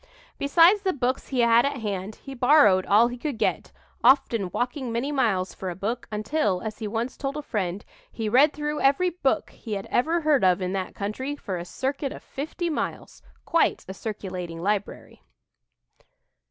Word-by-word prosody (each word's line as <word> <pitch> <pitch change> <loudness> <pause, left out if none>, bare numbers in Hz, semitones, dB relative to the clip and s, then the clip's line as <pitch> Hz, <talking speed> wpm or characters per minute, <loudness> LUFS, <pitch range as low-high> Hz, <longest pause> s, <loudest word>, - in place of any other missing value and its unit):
Besides 335 +8 +5
the 380 -2 0
books 255 -1 -1
he 255 -3 0
had 235 0 +5
at 280 0 -1
hand, 205 -1 -4
he 275 - -10
borrowed 245 -8 +5
all 215 +4 +5
he 245 0 -7
could 285 -3 -3
get, - - -1 0.3
often 235 -6 +4
walking 245 - -3
many 240 +5 -1
miles 215 -10 0
for 190 - -5
a 175 - -5
book, 225 +7 -3
until, 210 -2 0
as 220 0 -5
he 220 - -3
once 230 +4 -3
told 275 +1 -4
a 300 - -5
friend, 195 -5 -3 0.3
he 225 -2 -4
"read 265 +7 +5
through 300 0 -3
every 285 +7 +3
book 310 -6 -1
he 220 - -7
had 195 -1 -3
ever 325 +7 +2
heard 300 -6 +3
of 185 0 +4
in 185 0 -2
that 190 -1 -3
country, 260 +8 -3
for 200 -9 -5
a 170 -1 -5
circuit 270 - -3
of - - -9
fifty 315 +5 -4
miles" 320 - -4 0.2
quite 335 - +1
a 190 - -6
circulating 185 -5 -6
library! 200 +3 -3
240 Hz, 180 wpm, -25 LUFS, 200-285 Hz, 0.3 s, Besides